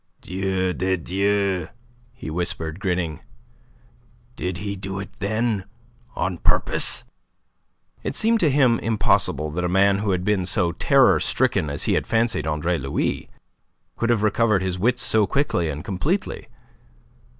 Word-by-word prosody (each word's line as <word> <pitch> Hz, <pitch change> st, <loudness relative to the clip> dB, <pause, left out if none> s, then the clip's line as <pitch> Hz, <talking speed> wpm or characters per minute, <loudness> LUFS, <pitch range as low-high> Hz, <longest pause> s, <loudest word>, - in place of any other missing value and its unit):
"Dieu 95 Hz, 0 st, -2 dB
de 95 Hz, 0 st, 0 dB
Dieu!" 95 Hz, 0 st, 0 dB, 0.4 s
he 120 Hz, -10 st, -8 dB
whispered, 80 Hz, 0 st, -3 dB
grinning. 90 Hz, -6 st, -2 dB, 1.2 s
"Did 90 Hz, -1 st, -3 dB
he 100 Hz, +2 st, -4 dB
do 95 Hz, 0 st, -5 dB
it, 100 Hz, -, -7 dB
then, 110 Hz, 0 st, -1 dB, 0.5 s
on 90 Hz, -1 st, -2 dB
purpose?" -, -, +2 dB, 1.0 s
It -, -, -4 dB
seemed 225 Hz, +1 st, +3 dB
to 165 Hz, -, +3 dB
him 130 Hz, -4 st, +3 dB
impossible 75 Hz, -8 st, +1 dB
that 90 Hz, +4 st, -3 dB
a 90 Hz, -, 0 dB
man 100 Hz, +2 st, +3 dB
who 105 Hz, 0 st, -2 dB
had 90 Hz, -2 st, 0 dB
been 100 Hz, -4 st, +1 dB
so 90 Hz, -3 st, +1 dB
terror 135 Hz, -, +4 dB
stricken 100 Hz, -, +1 dB
as 70 Hz, -, -2 dB
he -, -, +1 dB
had -, -, 0 dB
fancied 115 Hz, -9 st, +1 dB
Andre 80 Hz, +2 st, -1 dB
Louis, 70 Hz, 0 st, -2 dB, 0.7 s
could 115 Hz, -, -1 dB
have 115 Hz, -3 st, +2 dB
recovered 105 Hz, -2 st, +2 dB
his 90 Hz, -1 st, -2 dB
wits 125 Hz, +5 st, +1 dB
so 110 Hz, -2 st, +3 dB
quickly 135 Hz, -, 0 dB
and 75 Hz, 0 st, -6 dB
completely. 150 Hz, -, -2 dB
95 Hz, 145 wpm, -23 LUFS, 90-110 Hz, 1.2 s, terror